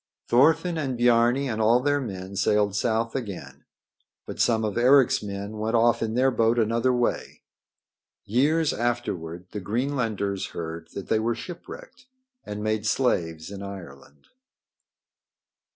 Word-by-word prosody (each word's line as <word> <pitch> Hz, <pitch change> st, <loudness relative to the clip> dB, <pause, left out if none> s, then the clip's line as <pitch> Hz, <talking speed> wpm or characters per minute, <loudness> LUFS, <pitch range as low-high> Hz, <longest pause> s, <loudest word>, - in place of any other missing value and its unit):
Thorfinn 160 Hz, +7 st, +3 dB
and 130 Hz, -5 st, -2 dB
Biarni 120 Hz, +3 st, +3 dB
and 110 Hz, -3 st, -2 dB
all 115 Hz, +3 st, +4 dB
their 145 Hz, +2 st, +1 dB
men 95 Hz, -5 st, -6 dB
sailed 100 Hz, +1 st, +2 dB
south 115 Hz, +1 st, 0 dB
again. 105 Hz, -8 st, -6 dB, 0.6 s
But -, -, -8 dB
some 110 Hz, -2 st, +2 dB
of 105 Hz, -, -3 dB
Eric's 130 Hz, +2 st, +4 dB
men 100 Hz, +1 st, -6 dB
went 110 Hz, +2 st, -1 dB
off 115 Hz, +1 st, +3 dB
in 115 Hz, 0 st, -2 dB
their 130 Hz, +2 st, +3 dB
boat 115 Hz, -1 st, +2 dB
another 115 Hz, +2 st, +2 dB
way. 120 Hz, -1 st, -2 dB, 0.8 s
Years 145 Hz, +8 st, +2 dB
afterward 90 Hz, -8 st, -3 dB
the 105 Hz, -, -4 dB
Greenlanders 110 Hz, -3 st, -2 dB
heard 80 Hz, 0 st, -5 dB
that 100 Hz, -, -6 dB
they 110 Hz, -, +2 dB
were 115 Hz, +1 st, 0 dB
shipwrecked 250 Hz, -, -10 dB, 0.4 s
and 105 Hz, 0 st, -6 dB
made 110 Hz, 0 st, -1 dB
slaves 85 Hz, -9 st, 0 dB
in 100 Hz, -1 st, -7 dB
Ireland. 90 Hz, -7 st, -11 dB
115 Hz, 135 wpm, -25 LUFS, 100-125 Hz, 0.8 s, all